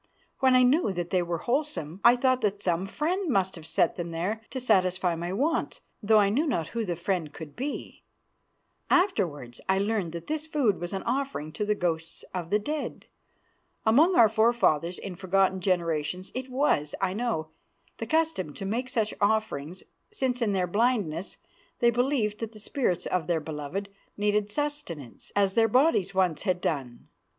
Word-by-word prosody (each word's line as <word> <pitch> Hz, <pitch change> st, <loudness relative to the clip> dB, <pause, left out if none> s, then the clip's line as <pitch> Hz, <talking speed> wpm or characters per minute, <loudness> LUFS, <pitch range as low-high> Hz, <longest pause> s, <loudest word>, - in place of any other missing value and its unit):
When 260 Hz, -1 st, +5 dB
I 255 Hz, -, +6 dB
knew 260 Hz, -, +3 dB
that 175 Hz, -1 st, -4 dB
they 185 Hz, -, +3 dB
were 170 Hz, -1 st, -2 dB
wholesome 235 Hz, -, -2 dB
I 240 Hz, +1 st, +8 dB
thought 255 Hz, 0 st, +2 dB
that 205 Hz, -1 st, 0 dB
some 180 Hz, +1 st, 0 dB
friend 345 Hz, -, -1 dB
must 190 Hz, -6 st, +1 dB
have 160 Hz, -2 st, -9 dB
set 165 Hz, -, +1 dB
them 170 Hz, -1 st, -3 dB
there 180 Hz, +7 st, -2 dB
to 260 Hz, -, -4 dB
satisfy 185 Hz, -6 st, +2 dB
my 170 Hz, +2 st, -4 dB
wants, 295 Hz, -, 0 dB, 0.2 s
though 215 Hz, 0 st, +4 dB
I 200 Hz, -1 st, +5 dB
knew 285 Hz, +10 st, +1 dB
not 170 Hz, -, -1 dB
who 230 Hz, -1 st, -2 dB
the 180 Hz, -5 st, -2 dB
friend 170 Hz, -2 st, -2 dB
could 150 Hz, -2 st, -10 dB
be. 275 Hz, +4 st, -5 dB, 0.9 s
Afterwards 170 Hz, -, +1 dB
I 190 Hz, -, +4 dB
learned 200 Hz, -3 st, 0 dB
that 170 Hz, -1 st, -6 dB
this 310 Hz, 0 st, -2 dB
food 270 Hz, -11 st, +1 dB
was 175 Hz, -, -4 dB
an 195 Hz, -1 st, -3 dB
offering 255 Hz, -, -2 dB
to 210 Hz, +7 st, -3 dB
the 210 Hz, 0 st, +1 dB
ghosts 165 Hz, -3 st, -3 dB
of 175 Hz, -3 st, -4 dB
the 210 Hz, -, +3 dB
dead. 295 Hz, +8 st, -4 dB, 0.8 s
Among 300 Hz, +12 st, +5 dB
our 230 Hz, -, +8 dB
forefathers 220 Hz, -7 st, +2 dB
in 195 Hz, -, -6 dB
forgotten 190 Hz, +1 st, +1 dB
generations 175 Hz, -1 st, -1 dB
it 255 Hz, +1 st, -5 dB
was, 250 Hz, -, +1 dB
I 190 Hz, -1 st, 0 dB
know, 210 Hz, -8 st, -2 dB, 0.5 s
the -, -, -4 dB
custom 315 Hz, -, 0 dB
to 195 Hz, -, -6 dB
make 240 Hz, +6 st, -2 dB
such 220 Hz, -4 st, 0 dB
offerings, 200 Hz, -6 st, 0 dB, 0.3 s
since 260 Hz, -, -1 dB
in 215 Hz, -3 st, +1 dB
their 185 Hz, -2 st, +1 dB
blindness 200 Hz, -4 st, 0 dB, 0.4 s
they 235 Hz, 0 st, +4 dB
believed 240 Hz, -4 st, 0 dB
that 225 Hz, -1 st, -5 dB
the 215 Hz, -, -12 dB
spirts 205 Hz, -, -1 dB
of 175 Hz, -4 st, -1 dB
their 170 Hz, -2 st, +1 dB
beloved 155 Hz, +6 st, -5 dB, 0.3 s
needed 210 Hz, 0 st, +1 dB
sustenance 250 Hz, -, -4 dB
as 200 Hz, -1 st, +3 dB
their 225 Hz, +1 st, +4 dB
bodies 225 Hz, -, +3 dB
once 180 Hz, -5 st, +2 dB
had 185 Hz, -3 st, 0 dB
done. 135 Hz, -8 st, -3 dB
200 Hz, 175 wpm, -27 LUFS, 175-245 Hz, 0.9 s, I